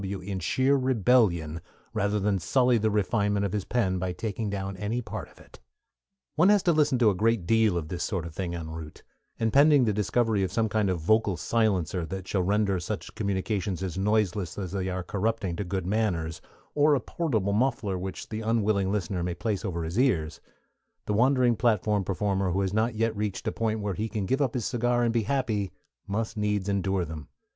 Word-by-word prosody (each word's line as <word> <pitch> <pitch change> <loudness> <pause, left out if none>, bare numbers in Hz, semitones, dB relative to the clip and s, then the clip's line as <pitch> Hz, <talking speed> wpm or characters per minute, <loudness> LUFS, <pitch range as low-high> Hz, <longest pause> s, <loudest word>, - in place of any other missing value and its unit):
W. 100 0 -4
in 95 +1 -4
sheer 130 +10 +2
rebellion, 110 - +2 0.3
rather 105 -1 0
than 100 -1 +1
sully 125 +5 +3
the 110 +1 +1
refinement 105 -1 +1
of 100 - -3
his 105 -3 -2
pen 95 -7 0
by 90 0 -2
taking 110 +2 -3
down 95 -1 -4
any 105 +5 -2
part 120 - -6
of - - -21
it. - - -17 0.8
One 170 +5 +5
has 205 -2 +4
to 175 - +4
listen 150 -5 +3
to 115 -4 +4
a - - -1
great 110 -1 +1
deal 110 -2 +3
of 80 -3 -3
this 90 -1 -3
sort 90 -5 -2
of 85 - -8
thing 85 -2 -3
en 80 -2 -6
route, 80 -1 -9 0.4
and 110 -1 0
pending 145 -2 +6
the 105 - +1
discovery 110 +1 +1
of 95 -2 -1
some 110 +1 +1
kind 105 -2 +1
of 90 -2 -1
vocal 100 +2 +2
silencer 95 -3 0
that 95 0 -6
shall 95 - 0
render 100 0 +1
such 100 +4 -5
communications 100 -2 -2
as 90 -3 -3
noiseless 100 -2 0
as 95 -4 -4
they 95 -1 -2
are 90 0 -3
corrupting 105 -2 -1
to 105 - -2
good 95 -1 -3
manners, 90 -6 -1 0.3
or 150 0 +4
a - - +1
portable 110 - -1
muffler 115 -3 0
which 95 +1 -6
the 110 0 -4
unwilling 110 -3 +1
listener 95 -3 -2
may 90 0 -2
place 105 0 -2
over 85 -5 -3
his 85 +8 -2
ears, 85 - +1 0.6
the 105 - -1
wandering 125 +1 +3
platform 105 -2 +1
performer 95 0 0
who 95 - +1
has 95 0 -1
not 110 +2 +1
yet 115 0 0
reached 105 -2 -3
a - - +1
point 110 -1 -1
where 100 -1 -2
he 110 +4 -3
can 105 -3 -3
give 130 +9 0
up 135 -3 0
his 120 - -1
cigar 120 0 +1
and 115 -1 +1
be 115 - +2
happy 110 -5 -1 0.4
must 110 +2 -3
needs 105 -2 0
endure 95 -2 0
them. 80 -1 -8
105 Hz, 210 wpm, -27 LUFS, 95-115 Hz, 0.8 s, pending